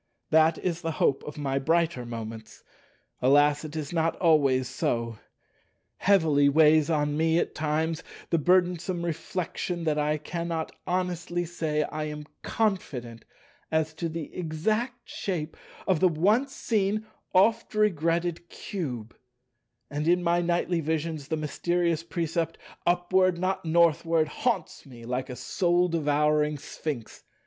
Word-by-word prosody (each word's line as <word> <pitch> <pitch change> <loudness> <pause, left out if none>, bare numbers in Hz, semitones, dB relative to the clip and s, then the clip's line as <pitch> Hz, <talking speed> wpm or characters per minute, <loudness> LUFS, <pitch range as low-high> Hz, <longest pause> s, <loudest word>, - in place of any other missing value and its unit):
That 160 +1 +5
is 170 -2 -2
the 165 -2 -2
hope 135 -2 +1
of 150 0 -7
my 135 -2 -1
brighter 160 -4 +1
moments. 115 -1 -7 0.6
Alas, 145 +3 +4
it 155 0 -7
is 155 0 -4
not 165 -1 +1
always 140 -7 +3
so. 115 -3 -2 0.8
Heavily 155 -8 +4
weights 155 +1 +5
on 150 -2 +1
me 160 +1 +2
at - - 0
times 155 +1 -1 0.3
the 165 - +3
burdensome 180 +1 +2
reflection 170 +1 -3
that 155 -2 +1
I 150 +1 +1
cannot 165 +1 -3 0.2
honestly 175 -1 -1
say 160 -3 -1
I 155 +1 -4
am 150 0 -6 0.2
confident 130 - -2 0.5
as 160 0 +1
to 165 +1 -3
the 160 -2 -6
exact 215 +10 -2
shape 170 -6 -4 0.3
of 185 -4 +3
the 185 - +5
once 210 - +2
seen, 215 -1 0 0.3
oft 215 +4 +3
regretted 170 -4 +1
Cube; 125 - -5 0.8
and 150 +2 -2
in 175 +1 +3
my 175 0 +2
nightly 175 0 0
visions 160 -2 -2
the 160 - -1
mysterious 170 +2 0
precept, 165 -1 -2 0.3
"Upward, 180 +1 +3
not 185 +1 -1
Northward," 165 -1 +3
haunts 200 0 -2
me 120 -4 -12
like 125 +2 -3
a 125 - -5
soul 180 +3 +1
devouring 150 -1 +2
Sphinx. 140 -3 -6
160 Hz, 135 wpm, -27 LUFS, 150-175 Hz, 0.8 s, That